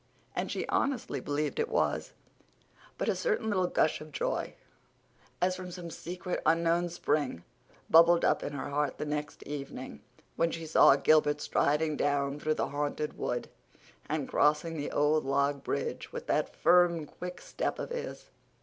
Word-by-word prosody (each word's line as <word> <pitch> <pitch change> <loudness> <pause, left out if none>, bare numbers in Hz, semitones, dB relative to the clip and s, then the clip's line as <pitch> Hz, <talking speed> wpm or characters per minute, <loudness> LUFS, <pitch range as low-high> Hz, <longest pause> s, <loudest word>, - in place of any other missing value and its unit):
And - - -2
she - - -3
honestly 270 -3 0
believed 145 +1 -2
it 455 +1 0
was. - - 0 0.8
But - - -2
a - - +2
certain 425 - 0
little 185 -3 +2
gush 155 - +1
of 155 0 -10
joy, 130 - -2 0.8
as 185 +1 +2
from 185 0 -7
some 175 -1 -7
secret, 180 +2 -5
unknown 170 +2 +2
spring, 150 - -1 0.4
bubbled 170 +1 +6
up - - +2
in 145 - -4
her 145 - -4
heart 145 0 0
the - - -3
next 150 0 -4
evening, 135 - -7 0.3
when 165 - +2
she 165 0 -5
saw 155 -3 +6
Gilbert 150 0 +3
striding 150 +1 +1
down 140 0 0
through 155 +1 0
the - - -1
Haunted 145 +1 -2
Wood 120 0 -2 0.6
and 150 -3 -1
crossing 150 +3 +2
the 145 -2 -3
old 150 +1 +2
log 140 +1 0
bridge 470 0 -3
with 480 0 -6
that - - 0
firm, 175 -3 +4
quick 180 +4 -8
step - - -3
of - - -5
his. 485 0 -6
155 Hz, 160 wpm, -30 LUFS, 145-175 Hz, 0.8 s, bubbled